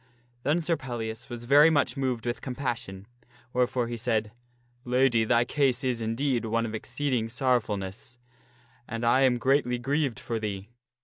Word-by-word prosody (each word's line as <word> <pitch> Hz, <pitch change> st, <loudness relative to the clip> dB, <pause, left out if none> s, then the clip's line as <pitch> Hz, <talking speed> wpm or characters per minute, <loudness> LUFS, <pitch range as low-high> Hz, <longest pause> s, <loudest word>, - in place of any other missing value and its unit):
Then 150 Hz, +7 st, +1 dB
Sir 165 Hz, +1 st, +1 dB
Pellias 120 Hz, -3 st, -5 dB
was 120 Hz, -1 st, -6 dB
very 145 Hz, +5 st, +7 dB
much 150 Hz, -2 st, +2 dB
moved 130 Hz, -4 st, -2 dB
with 120 Hz, 0 st, -2 dB
compassion, 120 Hz, -7 st, -4 dB, 0.5 s
wherefore 125 Hz, -1 st, +1 dB
he 120 Hz, 0 st, -4 dB
said, 110 Hz, -2 st, 0 dB, 0.3 s
" 120 Hz, 0 st, -38 dB
Lady, 125 Hz, -2 st, +3 dB
thy 120 Hz, +1 st, +3 dB
case 130 Hz, -2 st, +1 dB
is, 125 Hz, -3 st, -1 dB
indeed, 120 Hz, +2 st, 0 dB
one 115 Hz, +1 st, 0 dB
of 110 Hz, -, -5 dB
exceeding 120 Hz, 0 st, -2 dB
sorrowfulness, 120 Hz, -3 st, -1 dB, 0.7 s
and 115 Hz, +1 st, -3 dB
I 125 Hz, +3 st, +4 dB
am 130 Hz, -2 st, +4 dB
greatly 130 Hz, 0 st, +2 dB
grieved 135 Hz, 0 st, -1 dB
for 115 Hz, -1 st, -3 dB
thee. 100 Hz, -1 st, -5 dB
120 Hz, 160 wpm, -27 LUFS, 115-130 Hz, 0.7 s, very